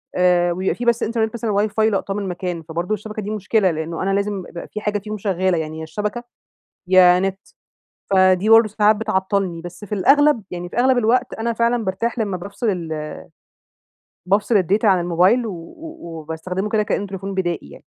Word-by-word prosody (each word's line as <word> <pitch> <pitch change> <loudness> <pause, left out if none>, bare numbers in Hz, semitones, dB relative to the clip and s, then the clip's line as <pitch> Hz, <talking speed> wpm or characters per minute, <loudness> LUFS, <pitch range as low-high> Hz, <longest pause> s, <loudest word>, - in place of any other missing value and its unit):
آآ، 180 -1 +3
ويبقى 185 +2 -1
في 245 - -5
بس 235 -1 +2
إنترنت 220 -1 -1
مثلًا 230 -2 -2 0.2
الWi-Fi 215 +1 -7
لاقطاه 195 0 -1
من 205 - -3
المكان، 180 -2 -4
فبرضو 170 +6 -3
الشبكة 215 0 -5
دي 205 - -5
مشكلة 215 -2 +1
لأنه 160 +1 -4
أنا 195 +1 0
لازم 200 -1 -1
يبقى 170 - -8
في 215 - -6
حاجة 210 0 -1
فيهم 215 +1 -6
شغالة 185 -3 0
يعني 160 0 -4
يا - - -5
الشبكة، 210 +8 -4 0.6
يا 180 -1 +6
نت، 195 0 -1 0.7
فدي 185 +1 +4
برضو 225 0 +7
ساعات 210 0 +3
بتعطلني. 190 -4 -1
بس 175 +4 -9
في 210 - -4
الأغلب 280 +3 +4
يعني 175 0 -5
في - - -10
أغلب 255 +1 +4
الوقت 245 +2 +2
أنا 230 +1 -2
فعلًا 235 0 +1
بارتاح 230 +6 -2
لما 200 -4 -1
بافصل 200 +5 -3
ال 170 -5 -3
آآ 155 0 -5 1.1
بافصل 205 +5 +1
الData 200 +6 +1
عن 190 -3 +5
الموبايل 180 +8 +2
و 170 -5 -8 0.3
وباستخدمه 165 +4 -5
كده 215 0 +1
كأنه 205 -1 -2
تليفون 195 0 -6
بدائي 175 - -2
يعني. - - -14
195 Hz, 185 wpm, -20 LUFS, 180-215 Hz, 1.1 s, برضو